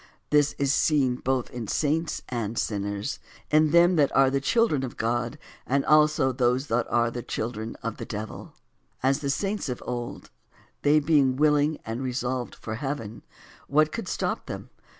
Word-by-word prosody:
This 145 -1 +4
is 140 0 +1
seen 135 -5 +2
both 130 -1 -1
in 120 -3 -5
saints 160 +6 0
and 115 -2 -3
sinners; 100 +3 -2 0.3
in 155 0 +5
them 170 +2 +5
that 145 -3 +4
are 135 -1 +5
the 135 0 0
children 230 - +2
of 130 - -6
God, 120 +4 -1 0.3
and 135 +1 +1
also 150 -3 +4
those 125 +1 +1
that 120 +1 +1
are 120 -1 +2
the 120 - -5
children 110 -1 -4
of 115 -1 -3
the - - -6
devil. 110 0 -6 0.5
As, 135 +1 +3
1. - - -12
The 140 - -2
saints 195 +3 -1
of 125 - -4
old, 120 -1 -5 0.5
they 150 +1 +5
being 145 -4 +3
willing 150 +1 +3
and 115 +3 -4
re 130 -1 -2
solved 125 0 -3
for 110 - -6
heaven, 125 -5 -4 0.5
what 155 +2 +3
could 230 - -5
stop - - -2
them - - -7
135 Hz, 175 wpm, -26 LUFS, 120-150 Hz, 0.5 s, in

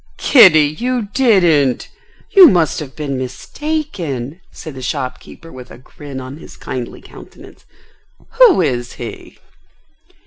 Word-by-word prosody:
"Kitty, 185 - +6
you 245 -4 -2
didn't! 175 - +2 0.4
You 380 -3 +9
must 170 - +1
have 140 -4 -9
been 140 -4 -4
mistaken?" 170 - -5
said 155 -3 -10
the 130 - -10
shopkeeper 130 +5 -6
with 125 -1 -12
a - - -13
grin 135 +2 -11
on 130 +2 -9
his - - -14
kindly 125 -2 -7
countenance. - - -16 0.7
"Who 475 - +6
is 120 -4 -3
he?" - - -10
155 Hz, 125 wpm, -16 LUFS, 130-215 Hz, 0.7 s, You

